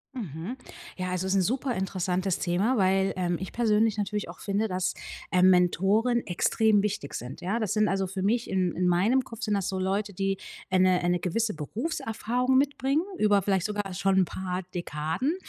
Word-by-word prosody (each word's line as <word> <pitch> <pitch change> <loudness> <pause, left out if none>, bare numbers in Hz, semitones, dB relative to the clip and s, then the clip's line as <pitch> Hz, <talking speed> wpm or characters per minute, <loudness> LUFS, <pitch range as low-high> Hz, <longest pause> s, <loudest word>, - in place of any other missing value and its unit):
Mhm. 190 - -5 0.4
Ja, 185 -1 -3
also 180 0 -2
ist 190 - 0
'n 195 - +4
super 250 +5 0
interessantes 185 -1 -1
Thema, 195 +9 +1
weil, 190 0 +2
ähm, 175 -2 -1
ich 190 - -6
persönlich 220 -2 +2
natürlich 205 -2 -2
auch 175 - -10
finde, 205 +2 0
dass, 185 -2 -1 0.4
ähm, 185 0 +5
Mentoren 195 +7 +3
extrem 205 +3 +2
wichtig 200 -9 -3
sind, 125 +3 -7
ja? 195 +6 -1
Das 215 -4 -1
sind 215 -1 +3
also 195 -1 0
für 190 +1 -5
mich 230 +5 +1
in 185 -2 0
in 180 0 +1
meinem 205 +10 +3
Kopf 230 -1 -11
sind 210 -3 0
das 195 -2 -1
so 190 -1 -2
Leute, 200 +2 -1
die, 195 +1 -1 0.3
äh, 185 - +2
'ne 185 -1 +4
äh, 175 - +1
'ne 175 0 +1
gewisse 210 +5 -1
Berufserfahrung 235 - -1
mitbringen 275 +1 +1 0.2
über 205 -1 +3
vielleicht 190 -2 0
sogar 205 -2 -3
schon 195 +1 +2
'n 185 - +4
paar 185 +1 -4
Dekaden 170 - -2
195 Hz, 195 wpm, -27 LUFS, 180-220 Hz, 0.4 s, ähm